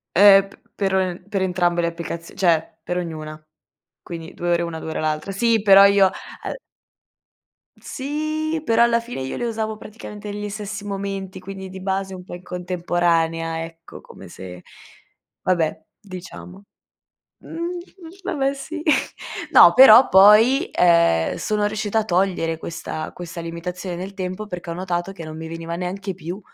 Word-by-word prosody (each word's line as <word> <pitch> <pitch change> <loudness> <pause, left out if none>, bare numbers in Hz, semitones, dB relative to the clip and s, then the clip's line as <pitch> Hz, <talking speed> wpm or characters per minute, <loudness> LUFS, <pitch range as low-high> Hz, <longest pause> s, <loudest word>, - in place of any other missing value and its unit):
Eh, 195 0 +7
p - - -19 0.2
per 195 -2 -1
en 185 0 -1
per 195 -2 -2
entrambe 175 -2 +1
le 170 - +1
applicazi 170 0 -6
cioè, 165 -4 +1
per 180 - -3
ognuna. 155 -3 -5 0.6
Quindi 165 -2 -8
2 175 0 -3
ore 170 0 +2
una, 165 -1 -4
2 160 - -6
ore - - -3
l'altra. 155 +5 -2
Sì, 230 +2 +2
però 195 -1 +8
io 200 -1 +5 0.4
uhm - - -3 1.3
Sì, 310 +3 -3
però 230 +1 +4
alla 235 0 +3
fine 235 - -7
io 130 - -4
le 240 - -2
usavo 220 -1 -3
praticamente 210 -1 -9
negli 205 0 -5
stessi 205 0 -6
momenti, 195 -1 -5
quindi 190 0 -8
di 190 0 -9
base 190 0 -2
un 180 - -10
po' 180 - -11
in 175 - -8
contemporanea, 170 -2 -1
ecco, 165 0 -12
come - - -13
se 90 -1 -10 0.8
vabbè, 170 -4 0 0.2
diciamo. 185 -1 -10 0.8
Mhmm, - - -11
mhmm, 350 +1 -3 0.4
vabbè, 275 -6 -1
sì. 310 +3 -7 0.7
No, - - +9
però 255 -1 +9
poi, 220 - +6
ehm, 170 - +3
sono 210 -1 0
riuscita 215 0 -1
a - - -3
togliere 175 -4 0
questa 160 -1 -6
questa 175 -1 -8
limitazione 175 +2 -5
nel 190 +2 -7
tempo, 185 +3 -5
perché 175 -3 -7
ho - - -3
notato 180 0 -3
che 170 -4 -9
non 155 0 -8
mi 160 0 -7
veniva 165 0 -6
neanche 190 +2 -4
più, 180 +3 -7
185 Hz, 160 wpm, -22 LUFS, 170-210 Hz, 1.3 s, No